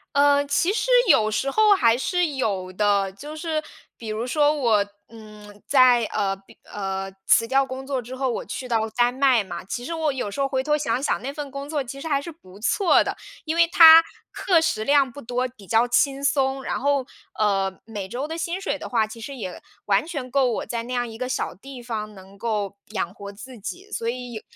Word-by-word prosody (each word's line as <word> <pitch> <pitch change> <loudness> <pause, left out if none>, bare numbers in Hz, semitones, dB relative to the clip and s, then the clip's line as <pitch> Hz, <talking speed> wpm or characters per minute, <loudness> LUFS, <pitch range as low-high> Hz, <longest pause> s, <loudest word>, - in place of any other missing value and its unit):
呃， 285 0 +4
其 345 +7 +1
实 435 +2 -1 0.2
有 215 0 +5
时 270 +6 -1
候 430 +3 +5
还 230 -9 +3
是 355 +6 0
有 195 -7 -2
的。 200 -1 +1
就 295 +10 -9
是， 315 -1 -2 0.4
比 230 - -9
如 215 +2 -3
说 295 +3 +3
我， 230 -8 +2 0.2
嗯， 210 -2 -14
在， 255 -3 +5
呃 200 -2 -1
比 195 0 -20
呃， 195 -1 -5 0.2
辞 230 - +5
掉 270 +2 +3
工 265 0 -7
作 265 -2 -2
之 245 +2 -8
后， 260 0 -1
我 - - -4
去 255 - -6
到 225 -2 0
丹 245 0 +3
麦 260 -4 +3
嘛， 175 -2 -7
其 240 +6 -5
实 335 - -4
我 320 -2 0
有 250 -6 -4
时 275 - -3
候 275 - +2
回 260 -1 -1
头 300 +2 +2
想 255 -4 -1
想 - - 0
那 270 - -4
份 285 -1 -7
工 275 +1 -7
作 295 -3 -1
其 275 +2 -8
实 320 - -5
还 285 -3 +1
是 335 - -7
不 195 - -17
错 350 - +3
的。 - - -3 0.3
因 315 +1 -1
为 335 0 +5
它 330 -2 +9 0.3
课 360 -4 +2
时 220 -9 0
量 280 +1 +3
不 285 - -10
多， 250 +1 -2
比 215 -6 -17
较 225 +4 +3
轻 270 +3 +1
松， 270 -1 +1
然 - - -2
后， 280 -1 +1 0.3
呃， 195 -2 0
每 210 -4 -6
周 250 +8 -4
的 325 +1 -5
薪 340 +2 -3
水 300 -7 -2
的 - - -6
话， 225 -3 +2
其 220 +2 -11
实 275 +5 -7
也 190 -8 -7 0.2
完 200 +5 +2
全 285 -7 -5
够 270 -2 +3
我 - - -3
在 230 +1 -4
那 250 +2 -6
样 245 -1 -1
一 225 -1 -9
个 255 +1 -3
小 - - -2
地 260 +6 -11
方 215 -3 -5
能 190 +1 -15
够 205 -3 -3
养 190 -4 -3
活 200 0 -9
自 230 +4 -11
己。 365 - -8
所 230 - -3
以 245 0 -5
有 220 - -6
250 Hz, 245 characters per minute, -23 LUFS, 215-285 Hz, 0.4 s, 它